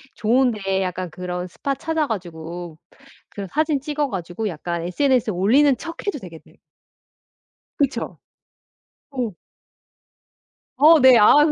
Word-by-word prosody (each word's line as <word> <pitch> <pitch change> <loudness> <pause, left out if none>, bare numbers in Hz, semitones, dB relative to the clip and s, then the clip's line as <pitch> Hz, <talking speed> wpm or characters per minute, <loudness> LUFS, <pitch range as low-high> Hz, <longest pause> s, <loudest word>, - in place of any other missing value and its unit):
좋은 245 +4 +2
데 195 -3 -2
약간 185 -1 -3
그런 180 +1 -5
스팟 275 +10 -3
찾아 320 +1 -1
가지고 175 -4 -6 0.5
그런 200 -1 -7
사진 305 - 0
찍어 295 +1 -2
가지고 185 +1 -4
약간 170 0 -4
SNS에 245 +5 +1
올리는 255 +10 +4
척해도 335 0 -5
되겠네. 170 -6 -13 1.2
그쵸? 280 -2 -1 0.9
어. 250 -6 -3 1.5
어. 310 +4 +7
네. 260 -2 +7
아 260 +7 +6
그 305 - +2
220 Hz, 235 characters per minute, -22 LUFS, 180-280 Hz, 1.5 s, 어